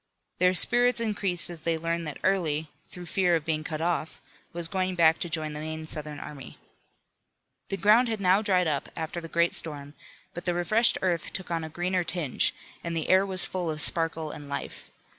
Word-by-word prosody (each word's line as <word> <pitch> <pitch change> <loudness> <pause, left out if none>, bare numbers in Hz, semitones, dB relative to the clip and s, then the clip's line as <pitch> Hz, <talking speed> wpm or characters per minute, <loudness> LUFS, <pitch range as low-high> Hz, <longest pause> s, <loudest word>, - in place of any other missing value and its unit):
Their 185 0 +4
spirits 245 +7 +5
increased 200 -6 +1
as 165 -2 -8
they 165 0 0
learned 165 0 -2
that 150 - -6
Early, 160 -5 0 0.2
through 180 -1 -9
fear 180 -1 +2
of 160 -2 -2
being 155 -1 -1
cut 155 0 -5
off, 165 -2 -2 0.3
was 170 -1 -3
going 185 +1 -2
back 165 -2 +4
to 175 - -3
join 155 -2 -2
the 150 - -6
main 160 +1 -5
Southern 150 -1 -5
army. 140 -3 -10 1.1
The 195 - -2
ground 215 +6 +5
had 220 -2 -2
now 190 +1 +3
dried 185 -5 +2
up 145 -3 -2
after 165 +1 -4
the 165 - -7
great 170 +1 +1
storm, 145 -2 0 0.4
but 175 - -7
the 175 -1 0
refreshed 215 +7 +3
earth 175 -3 0
took 185 -2 -5
on 165 -1 -1
a 160 - -6
greener 180 +2 -1
tinge, 165 -6 0 0.3
and 170 -1 -3
the 160 - -3
air 190 +1 +5
was 185 -1 +1
full 180 -3 -3
of 155 -1 -3
sparkle 160 -1 0
and 145 -1 -9
life. 140 - -6
170 Hz, 200 wpm, -27 LUFS, 155-185 Hz, 1.1 s, spirits